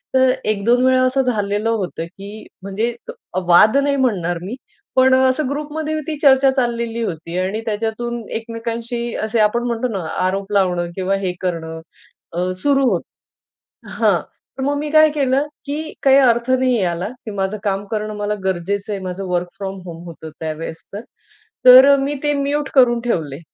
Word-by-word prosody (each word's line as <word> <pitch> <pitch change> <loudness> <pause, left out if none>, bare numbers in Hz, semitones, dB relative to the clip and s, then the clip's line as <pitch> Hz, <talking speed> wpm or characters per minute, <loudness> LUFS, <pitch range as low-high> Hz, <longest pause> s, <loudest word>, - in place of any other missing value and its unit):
तर 260 0 +5
1-2वेळा 245 +5 +3
असं 255 +1 +2
झालेलं 210 -3 -1
होतं, 190 -7 -2
की 200 +5 -11 0.2
म्हणजे 210 +5 -2 0.4
अ, - - 0
वाद 215 +8 +6
नाही 280 0 +2
म्हणणार 195 -10 0
मी. 200 +7 -5 0.4
पण 260 0 +5
असं 260 +2 +2
ग्रुपमध्ये 300 +2 -3
ती 315 - -2
चर्चा 270 -1 +6
चाललेली 235 -3 -1
होती 170 -3 -5
आणि 190 +4 -1
त्याच्यातून 230 +2 -3
एकमेकांशी 230 +1 -4
असे 220 +1 0
आपण 215 +3 +2
म्हणतो 235 +1 -1
ना, 210 -5 -3 0.2
आरोप 195 +2 -1
लावणं 180 -3 +1
किंवा 190 +1 0
हे 180 - 0
करणं 160 -3 -4 0.5
अ, 180 +2 -1
सुरु 280 -1 +3
होतं 180 - -5 0.7
हां - - +2 0.4
तर - - -1
मग 285 +2 0
मी 300 +1 -3
काय 310 0 +6
केलं, 275 -1 +1 0.2
की 305 +2 -4
काही 270 0 +6
अर्थ 240 -2 +3
नाही 260 0 +2
याला, 175 -1 -1
की 235 -2 -10
माझं 195 +1 -2
काम 200 0 -1
करणं 215 -1 -3
मला 205 0 -2
गरजेचं 195 +3 -2
आहे. 200 - -3
माझं 185 +1 -5
वर्क 180 0 -1
फ्रॉम 195 -1 -5
होम 170 -1 -9
होतं 160 -2 -9
त्यावेळेस 160 +1 -5
तर. 205 - -5 0.6
तर 260 +3 +9
मी 280 +2 -1
ते 295 0 +2
म्युट 285 +1 -1
करून 245 -3 +5
ठेवले. 160 - -2
225 Hz, 165 wpm, -19 LUFS, 190-260 Hz, 0.7 s, तर